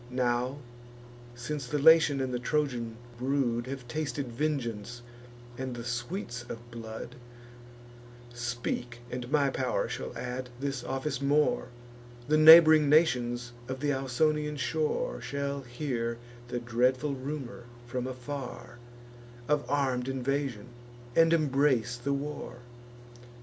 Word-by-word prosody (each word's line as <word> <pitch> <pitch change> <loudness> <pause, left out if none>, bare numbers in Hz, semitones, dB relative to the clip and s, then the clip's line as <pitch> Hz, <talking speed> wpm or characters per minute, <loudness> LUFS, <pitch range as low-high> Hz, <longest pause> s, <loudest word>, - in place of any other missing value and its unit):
Now, 125 +1 0 0.8
since 130 +2 -4
the 150 - -1
Latian 155 -2 +6
and 130 -1 -2
the 125 - -1
Trojan 120 -4 -1 0.2
brood 125 -2 0
Have 130 -2 -6
tasted 140 -1 -3
vengeance 120 -4 -3 0.6
and 130 -1 -3
the 120 - -6
sweets 125 - -4
of 120 +1 -8
blood; 115 +1 -8 1.2
Speak, 120 0 -4
and 125 +1 -5
my 145 -3 +3
pow'r 130 -1 -1
shall - - -5
add 125 +1 -4
this 135 -2 -3
office 135 +1 -3
more: 145 -2 +2 0.6
The 155 - +3
neighbr'ing 155 -1 +9
nations 120 -6 +3 0.2
of 130 0 -4
th' 145 +1 +1
Ausonian 150 +3 0
shore 160 - -1
Shall 140 0 -3
hear 120 -2 -3 0.3
the 120 0 -3
dreadful 125 +4 +1
rumour, 130 -3 -6 0.2
from 125 +1 -3
afar, 125 -1 -7 0.7
Of 150 0 +1
arm'd 130 -3 0
invasion, 135 -3 -2 0.5
and 165 0 +6
embrace 140 -6 +2
the 120 +3 -3
war." 140 -2 -4
130 Hz, 120 wpm, -29 LUFS, 120-145 Hz, 1.2 s, neighbr'ing